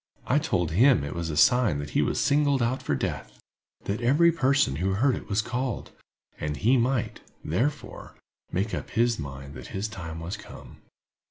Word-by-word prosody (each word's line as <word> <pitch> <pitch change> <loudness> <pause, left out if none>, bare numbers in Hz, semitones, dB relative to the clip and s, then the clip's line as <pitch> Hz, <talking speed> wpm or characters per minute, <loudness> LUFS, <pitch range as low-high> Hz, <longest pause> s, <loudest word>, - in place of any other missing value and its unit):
I 140 - +3
told 90 - -1
him 120 - +4
it 70 - -4
was 85 -1 -3
a 75 - -3
sign 120 - +4
that 70 0 -6
he - - +2
was - - 0
singled 140 -3 +2
out 125 +3 -1
for 70 - -1
death—that 100 - -6
every 150 +8 +4
person 135 - +2
who 95 +3 0
heard 130 +5 +2
it - - -9
was 105 +1 +1
called, 125 +1 -3 0.5
and 75 -1 -3
he 120 +6 +3
might, 125 0 0 0.3
therefore, 135 - -3 0.4
make 100 +4 -1
up - - -4
his 120 0 +1
mind 70 -1 -7
that - - -9
his 100 +3 -1
time 80 -6 -7
was 85 +5 -5
come. - - -12
110 Hz, 180 wpm, -26 LUFS, 80-130 Hz, 0.5 s, him